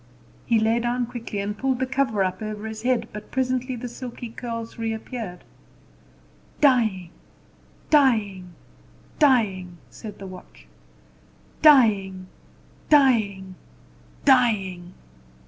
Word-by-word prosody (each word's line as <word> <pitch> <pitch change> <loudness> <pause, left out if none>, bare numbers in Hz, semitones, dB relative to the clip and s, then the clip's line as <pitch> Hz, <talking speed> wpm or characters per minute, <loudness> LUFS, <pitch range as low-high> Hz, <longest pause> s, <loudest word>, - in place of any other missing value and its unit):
He 235 - +3
lay 225 +2 +2
down 240 +1 -1
quickly, 235 -3 -7
and 205 +1 -3
pulled 260 +3 -1
the 260 - 0
cover 260 -6 0
up 185 +3 -3
over 215 0 -5
his 220 0 -6
head: 240 -2 0
but 210 0 -9
presently 255 0 -1
the 245 +1 -6
silky 240 0 -8
curls 230 -1 -7
reappeared. 225 -4 -5 1.2
"Dying, 220 - +2 0.8
dying, 205 - +2 0.6
dying!" 200 - +2
said 215 -3 -9
the 195 - -9
watch; 185 -1 -12 1.0
"dying, 205 -11 +5 0.6
dying, 215 -10 +3 0.7
dying!" 195 -9 +2
225 Hz, 105 wpm, -24 LUFS, 195-255 Hz, 1.2 s, dying